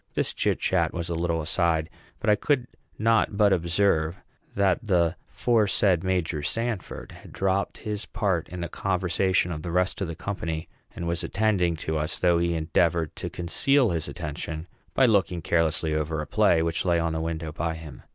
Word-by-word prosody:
This - - +1
chitchat - - +1
was 85 0 -4
a - - -1
little 85 0 0
aside; 80 -1 +1 0.3
but - - -5
I 105 - +6
could 125 +3 +1 0.3
not 110 -2 +2
but 100 -2 +5
observe 85 -2 +1 0.4
that 95 -2 +3
the 90 -5 +2 0.2
aforesaid 100 -6 +2
Major 90 -5 0
Sanford 115 +5 -3
had - - -13
dropped 95 0 0
his 105 -1 -5
part 95 -7 -1
in 90 +1 -6
the 85 - -2
conversation 95 0 0
of 80 -2 -4
the 85 - -5
rest 90 +3 0
of 95 - 0
the 85 - -5
company, 85 -3 -4 0.3
and 85 - -4
was 85 0 -1
attending 95 -5 +1
to 80 0 0
us, 75 +2 -1
though 85 -1 +3
he 85 0 +1
endeavored 80 0 +1
to - - -4
conceal 130 +8 +2
his 80 -2 -2
attention 75 +2 -5 0.3
by 135 - +5
looking 100 -6 +2
carelessly 80 -1 +1
over 80 0 -1
a 75 - -3
play 100 -5 +3
which 85 0 -1
lay 85 -2 +2
on 85 -1 0
the 80 - -2
window 80 -1 -3
by 80 +2 -2
him. 80 -2 -10
85 Hz, 180 wpm, -26 LUFS, 80-100 Hz, 0.4 s, I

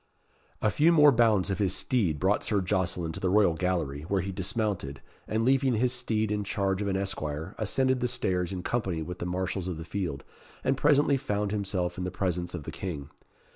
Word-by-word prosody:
A 110 - +3
few 160 +3 +4
more 150 -3 +7
bounds 110 -6 +3
of 95 - -2
his 95 -3 +2
steed 100 - +1
brought 95 +3 +2
Sir 105 - +1
Jocelyn 90 -3 0
to - - -6
the 95 - 0
royal 100 -3 +4
gallery, 80 -5 -1
where 100 0 +1
he 95 +2 -4
dismounted, 95 - -2 0.3
and 110 +1 0
leaving 135 -1 +3
his 125 +3 +2
steed 110 -4 -1
in 105 -1 0
charge 100 -1 -1
of 100 - -1
an 95 -1 0
esquire, 80 -3 -3
ascended 130 +4 +1
the 125 - +1
stairs 90 -7 -1
in 90 -2 -4
company 95 -9 -1
with 90 +3 -7
the 90 - -3
marshals 95 0 -2
of 90 -3 -3
the 80 - -7
field, 85 -8 -3 0.4
and 135 - +2
presently 145 0 +4
found 105 -6 -2
himself 95 -4 -1
in - - -2
the 90 - -2
presence 90 -1 -2
of 80 - -6
the - - -6
King. 75 -6 -6
95 Hz, 210 wpm, -28 LUFS, 90-110 Hz, 0.4 s, more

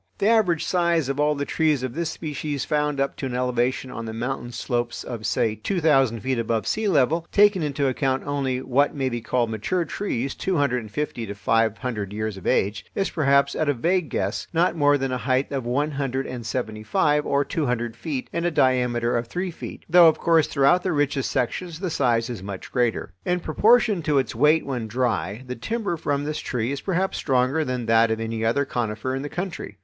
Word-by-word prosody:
The 200 - +2
average 200 -8 +3
size 170 -5 +1
of 140 +1 -2
all 150 0 +2
the 145 0 -2
trees 155 -5 +1
of 130 -2 -3
this 170 0 -2
species 150 -3 -4
found 150 -2 0
up 140 0 0
to 135 - -3
an 125 - -4
elevation 125 +1 0
on 115 - -6
the 110 - -5
mountain 120 +1 -4
slopes 120 -1 -2
of, 115 -3 -5
say, 110 - +1
two 175 - -2
thousand 135 -8 +3
feet 130 +1 -1
above 115 -1 -1
sea 220 0 0
level, 165 0 +2
taking 205 -2 +5
into 145 -2 0
account 130 0 0
only 135 -3 -1
what 140 +4 +2
may 135 -2 0
be 120 -1 -4
called 120 0 0
mature 165 - -1
trees 135 - -3
two 190 -3 -1
hundred 140 -3 +1
and 110 -2 -9
fifty 120 -1 -3
to 100 - -6
five 110 +1 +1
hundred 105 -6 -4
years 110 -1 -3
of 95 - -8
age, 100 +1 +1
is 195 - 0
perhaps, 140 -3 +3
at 155 -2 0
a 145 - +2
vague 170 +6 0
guess, 100 +2 -2
not 170 +1 +2
more 145 -2 +4
than 135 -1 -2
a 125 - -1
height 130 +3 0
of 135 -4 -3
one 145 +5 0
hundred 135 -2 -2
and 120 -3 -6
seventy 110 -3 -3
five 150 +7 +2
or 140 0 +1
two 155 -4 -2
hundred 120 -1 -2
feet 140 0 -4
and 170 - -1
a 175 - +2
diameter 125 -5 +2
of 120 0 -1
three 180 +7 -3
feet; - - -9
though, 175 0 +7
of 160 - +4
course, 165 -2 +3
throughout 140 +5 +3
the 185 - -1
richest 145 -3 0
sections 165 +7 -2
the 185 -2 -3
size 120 -6 +1
is 120 -6 -6
much 95 -1 -7
greater. 120 -7 0
In 180 0 0
proportion 210 +3 +3
to 150 -2 +1
its 135 - 0
weight 150 +7 +3
when 125 -5 -3
dry, 110 -3 -1
the 125 0 -5
timber 215 - -2
from 145 -3 -1
this 155 +1 -3
tree 120 0 -2
is 140 - -4
perhaps 190 0 -1
stronger 130 +4 +1
than 125 -4 -3
that 115 0 +4
of 110 0 -1
any 115 0 -3
other 120 +6 +2
conifer 120 0 -2
in 135 - -2
the 145 - -5
country. 175 - -5
135 Hz, 220 wpm, -24 LUFS, 120-155 Hz, -, though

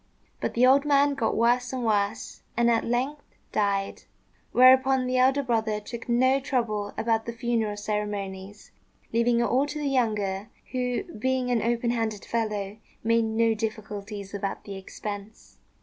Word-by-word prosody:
But - - -3
the 245 +2 +5
old 270 +2 +6
man 285 -1 +3
got 250 -5 -1
worse 245 +2 +2
and 255 -2 -3
worse, 205 -1 -1 0.2
and 235 0 +4
at 230 - +2
length 265 +5 -3 0.2
died; 200 -2 0 0.5
whereupon 260 +1 +6
the 255 0 0
elder 270 +2 +3
brother 220 -4 0
took 230 +3 -8
no 260 +3 +3
trouble 220 -7 -1
about 225 -1 0
the - - -2
funeral 230 -3 -1
ceremonies, 205 -1 -4 0.4
leaving 235 +1 +3
it - - +3
all 260 +4 +2
to 295 +1 -5
the 295 - -3
younger, 215 -6 0 0.2
who, 250 +3 -1
being 260 - -2
an 235 -2 +2
open 235 +1 0
handed 225 -3 -2
fellow, 210 -3 -2 0.3
made 230 0 +3
no 225 +1 +2
difficulties 210 -2 -5
about 200 -1 -4
the 200 - -7
expense. 205 +2 -8
230 Hz, 155 wpm, -26 LUFS, 210-255 Hz, 0.5 s, old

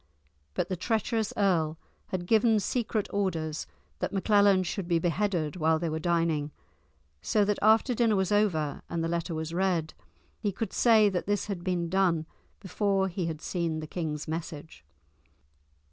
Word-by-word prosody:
But - - 0
the 185 - -2
treacherous 220 +3 -1
earl 165 -6 +2 0.3
had 180 -2 -3
given 220 +2 +4
secret 220 0 -1
orders 165 -6 -2 0.3
that - - -2
Maclellan 200 -1 +4
should 180 +1 -4
be 170 -1 +2
beheaded 175 -1 -1
while 160 -1 +3
they 170 0 -2
were 160 0 -2
dining, 165 -3 0 0.7
so 210 - +2
that 210 0 0
after 220 +4 +4
dinner 230 -2 +2
was 190 0 0
over, 170 -9 +1
and 170 -1 -2
the - - 0
letter 170 0 -2
was 160 +1 -4
read, 175 -4 0 0.5
he 205 -2 -1
could 220 +4 -4
say 220 -3 +5
that 185 -1 -3
this 205 -1 0
had 195 -4 -5
been 175 -2 -1
done 175 -3 +1 0.3
before 195 -1 0
he 180 -1 -3
had 160 -2 -5
seen 170 -3 -2
the 155 - -5
king's 155 -2 -4
message. 155 - -6
180 Hz, 160 wpm, -28 LUFS, 165-205 Hz, 0.7 s, say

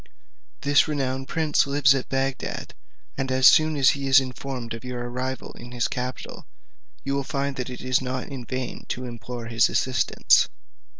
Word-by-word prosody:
This 145 +2 +4
renowned 135 -3 -2
prince 155 -3 +1
lives 140 -1 +4
at 135 -2 -3
Bagdad, 135 0 -3 0.5
and 135 -1 -1
as 130 0 +6
soon 155 0 +5
as 135 -2 +6
he 140 -1 -4
is 135 +1 +7
informed 130 -2 -5
of 115 - -8
your 125 -1 -5
arrival 130 +2 -4
in 120 +1 -11
his 120 -1 0
capital, 125 +1 -6 0.6
you 140 - -2
will 140 0 0
find 140 +1 -2
that 125 -1 -3
it 125 - -7
is 130 0 +1
not 130 0 -3
in 135 -3 -7
vain 130 +1 -5
to 125 - -3
implore 120 0 -7
his 115 0 +3
assistance. 130 -1 +3
130 Hz, 175 wpm, -25 LUFS, 125-140 Hz, 0.6 s, is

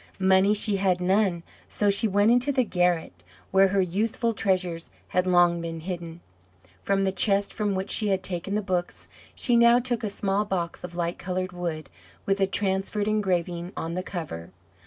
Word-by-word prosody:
Money 190 +1 +3
she 205 -1 +4
had 190 -2 +1
none, 185 -1 +1 0.3
so 205 -1 +1
she 200 +3 +3
went 205 +2 +3
into 245 +4 +3
the 260 -2 +2
garret, 175 - -1 0.3
where 195 0 +5
her 195 0 +1
youthful 220 +6 -1
treasures 185 -5 -1 0.2
had 180 0 0
long 175 -1 +3
been 165 -1 -5
hidden. 170 -1 -7 0.6
From 195 0 0
the 190 - +1
chest 200 +1 +1
from 205 -2 -1
which 190 +1 -2
she 215 - +2
had 190 -2 0
taken 185 +2 -4
the 210 - -1
books 180 -2 -3 0.3
she 240 - +1
now 235 0 +6
took 245 -1 -2
a 215 - -1
small 200 0 -1
box 180 -5 -4
of 175 -1 -8
light 170 0 -3
coloured 185 0 -3
wood, 170 -4 -5 0.4
with 195 0 0
a 195 - +3
transferred 195 +1 -1
engraving 180 -4 -1
on 165 +1 -4
the 185 - -2
cover. 160 - -6
190 Hz, 180 wpm, -25 LUFS, 175-205 Hz, 0.6 s, now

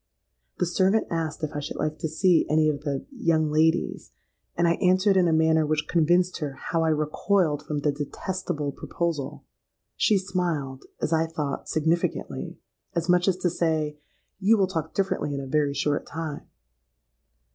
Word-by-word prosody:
The 180 - +1
servant 190 +5 +2
asked 165 0 -2
if 155 - -1
I - - -1
should 145 - -6
like 155 0 -2
to - - -1
see 170 +2 +3
any 155 0 +4
of 145 -1 -2
the 140 -2 -3
'young 165 - +1
ladies;' 160 +3 +1 0.5
and 170 0 +3
I 170 - +4
answered 185 +2 +4
in 185 -2 +4
a - - +2
manner 160 0 +4
which 150 0 -1
convinced 175 +2 +2
her 145 -3 -3
how 165 +4 -2
I 160 - +2
recoiled 155 +1 +1
from 150 -1 -3
the 150 - +2
detestable 150 +1 -3
proposal. 160 -1 -4 0.5
She 210 - +3
smiled—as 165 -7 -3
I 160 0 +2
thought, 150 -4 -4
significantly,—as 165 +1 -2
much 180 +1 +4
as 185 -2 +3
to 185 -1 0
say, 155 -3 -1 0.4
'You 210 +3 +4
will 195 - +4
talk 160 -4 -4
differently 190 -7 -1
in - - -3
a 135 - -5
very 145 +1 +1
short 145 0 0
time.' 160 -2 -5
160 Hz, 165 wpm, -26 LUFS, 150-180 Hz, 0.5 s, any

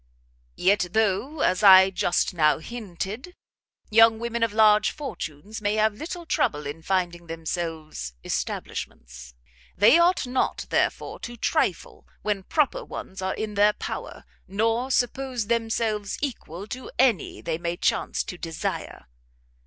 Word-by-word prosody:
"Yet 195 0 +2
though, 220 +8 0
as 185 - +2
I 190 -2 +8
just 180 -1 0
now 150 -4 +3
hinted, 215 - -6 0.6
young 225 0 +6
women 235 0 -3
of 230 -2 +2
large 210 -1 +5
fortunes 210 - -7
may 205 0 0
have 215 0 +3
little 335 - -7
trouble 150 - 0
in 145 +3 -6
finding 175 -1 -1
themselves 160 - -5
establishments, - - -5 0.4
they 220 - +7
ought 350 -2 +3
not, 250 +1 -1
therefore, - - 0
to 240 0 -7
trifle - - -1 0.2
when 205 -2 -1
proper 290 - 0
ones 190 0 -8
are 190 0 -1
in 215 -1 -4
their 205 +1 +4
power, - - -6 0.2
nor 225 +5 0
to - - +2
suppose 250 -1 -1
themselves 225 -2 -1
equal 205 - -5
to 255 +1 -6
any 245 -7 +2
they 165 -1 -3
may 170 0 -3
chance - - 0
to 180 - -8
desire." 165 -1 -4
210 Hz, 135 wpm, -25 LUFS, 175-235 Hz, 0.6 s, I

